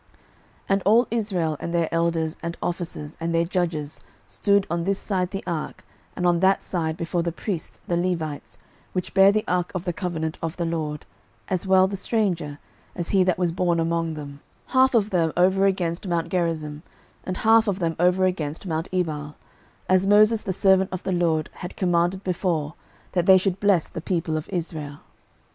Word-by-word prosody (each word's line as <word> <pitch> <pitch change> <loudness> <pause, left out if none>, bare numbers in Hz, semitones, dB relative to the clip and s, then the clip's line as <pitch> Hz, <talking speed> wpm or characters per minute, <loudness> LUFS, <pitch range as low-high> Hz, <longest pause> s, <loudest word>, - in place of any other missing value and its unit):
06:008:033 - - -36
And 195 0 +2
all 225 +4 +4
Israel, 185 -9 -1
and 170 - -4
their 170 -2 +1
elders, 165 -1 0
and 170 0 -4
officers, 170 -3 -4
and 165 0 -1
their 165 0 +3
judges, 165 -5 -2 0.2
stood 200 -1 +1
on 170 0 -1
this 195 +2 0
side 185 -4 -1
the 195 0 -5
ark 165 -4 -4 0.3
and 180 - -2
on 175 -1 +3
that 190 +2 +3
side 160 -3 -2
before 170 +1 -1
the 170 0 -1
priests 175 0 -5
the 175 - 0
Levites, 155 -9 -2 0.4
which 180 -1 -3
bare 195 0 +7
the 215 +1 0
ark 180 -1 0
of 185 0 -3
the 175 - -1
covenant 165 -3 -3
of 165 +1 -4
the 170 - -1
LORD, 155 -3 -3 0.4
as 185 0 -1
well 190 0 +5
the 195 - -4
stranger, 185 -8 -1 0.4
as 170 - -4
he 195 -2 +4
that 185 -1 +1
was 180 -2 +1
born 175 0 +1
among 165 -1 0
them; 145 -2 -8 0.3
half 260 -1 +4
of 215 -2 +2
them 165 -3 +2
over 190 +2 +4
against 180 -1 -1
mount 170 -1 -1
Gerizim, 160 -4 -2 0.4
and 185 0 -4
half 225 0 +4
of 195 -2 0
them 165 -4 -1
over 180 +2 +3
against 160 -3 -2
mount 165 -1 -2
Ebal; 150 -5 -2 0.5
as 185 +1 +3
Moses 215 +2 +5
the 195 - -3
servant 190 0 +3
of 185 - -5
the 190 - -2
LORD 165 -3 +1
had 175 - -8
commanded 175 +1 +1
before, 170 -5 -1 0.4
that 175 -2 0
they 190 -1 +9
should 190 0 -1
bless 200 -5 +3
the 165 - -7
people 165 -2 -1
of 155 - -4
Israel. 155 -4 -4
175 Hz, 190 wpm, -24 LUFS, 165-190 Hz, 0.5 s, they